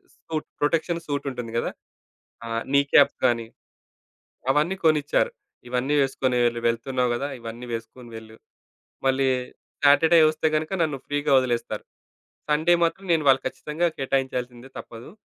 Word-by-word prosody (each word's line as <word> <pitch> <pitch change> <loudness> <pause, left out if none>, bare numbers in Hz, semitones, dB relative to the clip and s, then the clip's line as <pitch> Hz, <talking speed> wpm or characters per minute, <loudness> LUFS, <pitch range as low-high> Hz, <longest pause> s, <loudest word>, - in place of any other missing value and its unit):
Suit, 155 -1 -5
protection 165 +3 0
suit 145 -1 -2
ఉంటుంది 120 -3 -6
గదా! - - -1 0.8
ఆహ్, 115 0 -2
నీ 140 - +6
క్యాప్స్ 145 -2 +5
గాని 115 -1 0 1.1
అవన్నీ 155 +7 +1
కొనిచ్చారు. 155 - +2 0.4
ఇవన్నీ 125 +4 0
వేసుకుని 130 -2 0
వెళ్ళు. 120 0 -1
వెళ్తున్నావు 125 +2 -1
గదా! 140 +4 -3
ఇవన్నీ 115 +2 -8
వేసుకొని 115 +2 -8
వెళ్ళు. 110 0 -11 0.7
మళ్ళీ 135 0 +2 0.6
సాటర్డే 160 +4 +6
వస్తే 155 0 0
గనుక 155 +2 -1
నన్ను 150 -4 -2
ఫ్రీగా 145 0 -1
వదిలేస్తారు. 120 -2 -2 0.7
సండే 160 +4 +4
మాత్రం 170 +4 -2
నేను 160 -2 +2
వాళ్ళకి 130 0 +4
ఖచ్చితంగా 155 +3 -2
కేటాయించాల్సిందే 130 -2 -2
తప్పదు. 115 +3 -10
135 Hz, 130 wpm, -24 LUFS, 120-155 Hz, 1.1 s, నీ